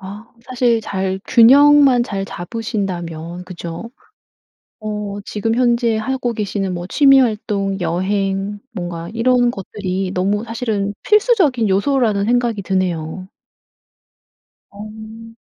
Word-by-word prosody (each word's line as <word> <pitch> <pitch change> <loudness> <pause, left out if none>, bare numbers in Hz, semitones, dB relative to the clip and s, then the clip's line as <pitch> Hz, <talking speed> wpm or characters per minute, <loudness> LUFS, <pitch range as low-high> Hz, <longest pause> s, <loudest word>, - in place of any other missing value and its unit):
아 200 +4 -9 0.2
사실 245 -2 +1
잘 190 -2 -3
균형만 275 +1 +6
잘 195 -4 -4
잡으신다면 175 -4 -5
그죠? 175 +4 -8 0.9
어 210 -2 -5
지금 225 +2 -2
현재 235 -2 +2
하고 245 +1 -2
계시는 200 -3 -3
뭐 175 0 -5
취미 275 +1 +5
활동, 210 -4 -1
여행 195 +3 -1
뭔가 175 -3 -5
이런 245 +1 +2
것들이 190 -3 -4
너무 200 +4 0
사실은 220 -3 -2 0.2
필수적인 380 - +3
요소라는 205 0 +1
생각이 240 -2 0
드네요. 185 -2 -2 1.4
어. 220 +2 -11
210 Hz, 230 characters per minute, -18 LUFS, 190-235 Hz, 1.4 s, 균형만